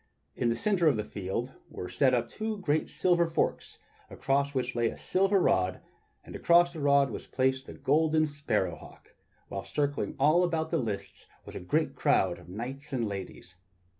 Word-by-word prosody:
In 120 Hz, -, 0 dB
the 115 Hz, -, +1 dB
centre 180 Hz, -, +1 dB
of 140 Hz, -7 st, +3 dB
the 105 Hz, -, -1 dB
field 105 Hz, +6 st, -4 dB, 0.2 s
were 90 Hz, -, -6 dB
set 130 Hz, +3 st, +2 dB
up 120 Hz, -, 0 dB
two 220 Hz, -1 st, -4 dB, 0.3 s
silver 175 Hz, -2 st, +2 dB
forks 165 Hz, -, -2 dB, 0.3 s
across 140 Hz, +1 st, -1 dB
which 125 Hz, -1 st, -1 dB
lay 120 Hz, -1 st, +1 dB
a -, -, -5 dB
silver 195 Hz, +1 st, +2 dB
rod, 95 Hz, -, +1 dB, 0.4 s
and -, -, -11 dB
across 175 Hz, 0 st, +4 dB
the 160 Hz, -, -7 dB
rod 140 Hz, -1 st, +3 dB
was -, -, -7 dB
placed 130 Hz, 0 st, 0 dB
the -, -, -9 dB
golden 155 Hz, +2 st, +2 dB
sparrow 145 Hz, -1 st, -1 dB
hawk, -, -, -16 dB, 0.3 s
while 100 Hz, -, -5 dB
circling 145 Hz, -1 st, -2 dB
all 155 Hz, +6 st, +4 dB
about 160 Hz, -2 st, -1 dB
the 165 Hz, -, +1 dB
lists 110 Hz, -6 st, -5 dB, 0.2 s
was -, -, -10 dB
a -, -, -4 dB
great 145 Hz, -, 0 dB
crowd 90 Hz, -8 st, +2 dB
of 90 Hz, 0 st, -15 dB
knights 130 Hz, +9 st, -7 dB
and 120 Hz, -4 st, -1 dB
ladies. 95 Hz, -2 st, -8 dB
140 Hz, 180 wpm, -29 LUFS, 115-160 Hz, 0.4 s, across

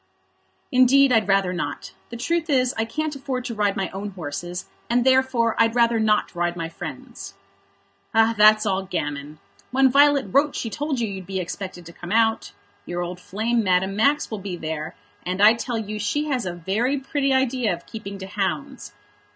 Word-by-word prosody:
"Indeed, 255 Hz, +2 st, +5 dB
I'd 220 Hz, -4 st, +3 dB
rather 195 Hz, -2 st, +2 dB
not. 145 Hz, -5 st, -5 dB, 0.2 s
The 235 Hz, -, -7 dB
truth 330 Hz, +6 st, -1 dB
is, 255 Hz, -3 st, +2 dB
I 225 Hz, -, 0 dB
can't 305 Hz, +6 st, -3 dB
afford 265 Hz, -2 st, -4 dB
to 235 Hz, -, -4 dB
ride 205 Hz, -2 st, 0 dB
my 195 Hz, -1 st, -1 dB
own 200 Hz, +2 st, -5 dB
horses, 175 Hz, 0 st, -6 dB, 0.2 s
and 240 Hz, +1 st, +2 dB
therefore 260 Hz, -3 st, +3 dB
I'd 225 Hz, 0 st, +3 dB
rather 235 Hz, -1 st, +3 dB
not 215 Hz, -1 st, +1 dB
ride 175 Hz, 0 st, -1 dB
my 165 Hz, -1 st, -4 dB
friends'." 165 Hz, -, -9 dB, 0.8 s
"That's 215 Hz, -1 st, +5 dB
all 195 Hz, -2 st, +1 dB
gammon. 145 Hz, -4 st, -4 dB, 0.3 s
When 265 Hz, 0 st, +3 dB
Violet 285 Hz, 0 st, +5 dB
wrote 285 Hz, +4 st, +3 dB
she 225 Hz, -, -3 dB
told 290 Hz, -1 st, -2 dB
you 230 Hz, -, 0 dB
you'd 190 Hz, -3 st, -7 dB
be 190 Hz, -1 st, -3 dB
expected 180 Hz, 0 st, -6 dB
to 170 Hz, -, -11 dB
come 175 Hz, +1 st, -9 dB
out. 225 Hz, 0 st, +2 dB, 0.4 s
Your 175 Hz, 0 st, -3 dB
old 175 Hz, +1 st, -6 dB
flame, 220 Hz, +5 st, -1 dB
Madame 190 Hz, 0 st, +1 dB
Max, 280 Hz, +7 st, +2 dB
will 215 Hz, -, -4 dB
be 190 Hz, -2 st, -5 dB
there, 160 Hz, -1 st, -5 dB, 0.3 s
and 180 Hz, +1 st, -3 dB
I 210 Hz, +2 st, +7 dB
tell 235 Hz, 0 st, -3 dB
you 215 Hz, -1 st, -4 dB
she 290 Hz, +9 st, -1 dB
has 250 Hz, -8 st, -1 dB
a 175 Hz, -, -3 dB
very 215 Hz, +11 st, 0 dB
pretty 275 Hz, 0 st, -1 dB
idea 260 Hz, -4 st, +1 dB
of 175 Hz, -1 st, -5 dB
keeping 200 Hz, -3 st, -8 dB
to 190 Hz, -, -7 dB
hounds. 190 Hz, -7 st, -4 dB
215 Hz, 185 wpm, -23 LUFS, 185-255 Hz, 0.8 s, I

